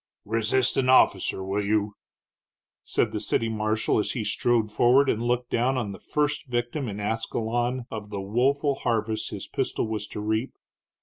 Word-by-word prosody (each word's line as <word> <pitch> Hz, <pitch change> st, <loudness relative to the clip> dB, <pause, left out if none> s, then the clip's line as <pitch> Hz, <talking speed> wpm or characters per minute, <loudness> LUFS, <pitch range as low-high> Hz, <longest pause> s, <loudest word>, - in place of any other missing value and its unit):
"Resist 115 Hz, +4 st, +1 dB
an 130 Hz, -1 st, +2 dB
officer, 130 Hz, -6 st, +4 dB
will 100 Hz, +2 st, -1 dB
you?" 105 Hz, 0 st, 0 dB, 0.9 s
said -, -, 0 dB
the -, -, -2 dB
city 115 Hz, -, 0 dB
marshal, 110 Hz, 0 st, 0 dB
as 105 Hz, -, -1 dB
he 115 Hz, -, -2 dB
strode 115 Hz, -1 st, +1 dB
forward 125 Hz, +6 st, +4 dB
and 110 Hz, -, -2 dB
looked 120 Hz, +1 st, -1 dB
down 130 Hz, +3 st, +1 dB
on 110 Hz, -5 st, -2 dB
the 95 Hz, -, -9 dB
first 150 Hz, -1 st, -1 dB
victim 120 Hz, +3 st, -2 dB
in 105 Hz, -1 st, -5 dB
Ascalon 115 Hz, +3 st, -1 dB
of 105 Hz, -2 st, -6 dB
the 100 Hz, -1 st, -4 dB
woeful 135 Hz, +8 st, +1 dB
harvest 110 Hz, -4 st, -1 dB
his 100 Hz, -2 st, -6 dB
pistol 130 Hz, -3 st, -2 dB
was 105 Hz, -2 st, -3 dB
to -, -, -7 dB
reap. 110 Hz, +4 st, -1 dB
115 Hz, 170 wpm, -26 LUFS, 105-125 Hz, 0.9 s, officer